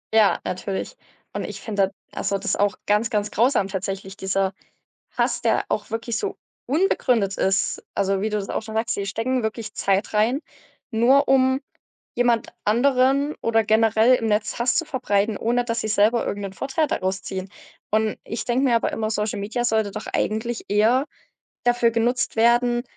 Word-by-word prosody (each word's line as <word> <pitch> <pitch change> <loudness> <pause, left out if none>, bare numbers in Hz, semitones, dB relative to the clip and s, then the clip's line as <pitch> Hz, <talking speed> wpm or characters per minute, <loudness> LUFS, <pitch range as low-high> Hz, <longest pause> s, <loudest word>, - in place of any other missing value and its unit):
Ja, 215 -2 +5
natürlich. 190 - -4 0.4
Und - - -3
ich - - -6
finde 200 -3 0
das - - -14 0.2
also 200 - -1
das - - -1
auch 205 0 +1
ganz, 210 +2 +2
ganz 210 -1 -1
grausam 235 -3 +2
tatsächlich, 195 0 -5
dieser 190 0 -1 0.6
Hass, - - -1
der - - +2
auch - - -2
wirklich 225 +1 -3
so - - -3 0.3
unbegründet 250 - +1
ist. 190 0 0
Also, 195 0 0
wie 215 - 0
du 210 - 0
das 195 - -5
auch - - -2
schon 220 0 -8
sagst, 225 +1 0
sie 200 - -3
stecken 235 +5 -1
wirklich 220 0 -4
Zeit 195 +2 0
rein, 225 +6 +2 0.5
nur 260 +6 +4
um 260 0 +4 0.5
jemand 240 -2 +1
anderen 265 +5 +3
oder 225 -1 +2
generell 220 +3 +4
im 225 -3 0
Netz 210 0 0
Hass 240 0 +1
zu 330 - +1
verbreiten, 210 -6 0
ohne 240 +3 +1
dass 230 -1 -2
sie 220 - -3
selber 215 +3 +3
irgend 205 - -3
'nen 195 - -5
Vorteil 275 +7 -1
daraus 190 -6 -2
ziehen. 190 0 -5 0.4
Und 215 0 +1
ich 230 - -5
denke 250 +3 +1
mir 245 -3 +4
aber 230 - 0
immer, 220 -1 -2
Social 210 -1 -1
Media 215 +4 -2
sollte 220 -3 +1
doch - - -7
eigentlich 225 +2 -2
eher 220 +6 +3 0.6
dafür 240 -1 +3
genutzt 240 +3 0
werden, 240 +1 +3
220 Hz, 180 wpm, -23 LUFS, 205-245 Hz, 0.6 s, Ja